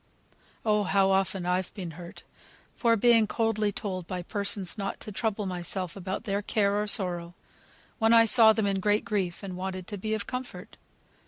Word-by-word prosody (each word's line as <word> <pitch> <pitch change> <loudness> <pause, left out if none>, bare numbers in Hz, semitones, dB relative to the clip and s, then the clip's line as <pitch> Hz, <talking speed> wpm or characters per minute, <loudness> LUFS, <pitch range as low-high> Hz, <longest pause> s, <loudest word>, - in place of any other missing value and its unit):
Oh! 210 -1 +3
how 195 +1 +3
often 190 -1 0
I've 180 +1 -1
been 180 -5 -6
hurt, 170 +2 -11 0.6
by 230 -2 +4
being 230 0 +4
coldly 215 -2 0
told 185 -4 -5
by 180 -1 -4
persons 200 -2 -2
not 195 -2 -4
to 215 - -7
trouble 210 0 -2
myself 180 0 -4
about 190 +2 -5
their 200 -2 -1
care, 205 0 +1
or 210 - -3
sorrow, 175 -4 0 0.6
when 225 -1 +3
I 230 0 +7
saw 225 -1 +8
them 220 -1 0
in 195 -1 0
great 210 +2 +1
grief, 190 -4 -2
and 190 -2 -6
wanted 185 0 -5
to 205 +1 -7
be 215 +3 -1
of 210 - -4
comfort. 250 0 -7
200 Hz, 180 wpm, -28 LUFS, 185-215 Hz, 0.6 s, saw